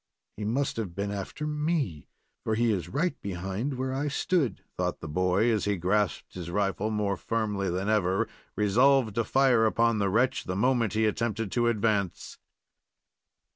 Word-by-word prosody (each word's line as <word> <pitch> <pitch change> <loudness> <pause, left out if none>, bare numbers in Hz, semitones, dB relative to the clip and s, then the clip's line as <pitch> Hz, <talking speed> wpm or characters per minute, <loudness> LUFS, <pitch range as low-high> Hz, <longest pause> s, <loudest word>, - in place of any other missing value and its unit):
"He 105 - -5
must 130 +5 -1
have 100 -7 -4
been 100 +1 -2
after 100 +9 -5
me, 150 - -1 0.4
for 110 - 0
he 115 0 +2
is 90 -5 -2
right 155 - -1
behind 95 +8 -3
where 130 +1 -2
I 140 +3 -1
stood," 140 - 0
thought - - -2
the 80 - -7
boy, 90 +8 +2
as 110 -2 0
he 100 -1 0
grasped 95 +3 0
his 90 -2 -6
rifle 100 +2 0
more 105 -2 0
firmly 105 -2 -1
than 95 +3 -2
ever, 95 -3 +2 0.3
resolved 115 +3 +3
to 115 - +1
fire 125 -2 +4
upon 115 0 +2
the 100 -1 +1
wretch 120 +7 +1
the 90 - -3
moment 115 0 +2
he 110 0 +2
attempted 110 -1 -1
to 120 -1 +1
advance. 105 -5 -1
110 Hz, 170 wpm, -28 LUFS, 100-120 Hz, 0.4 s, fire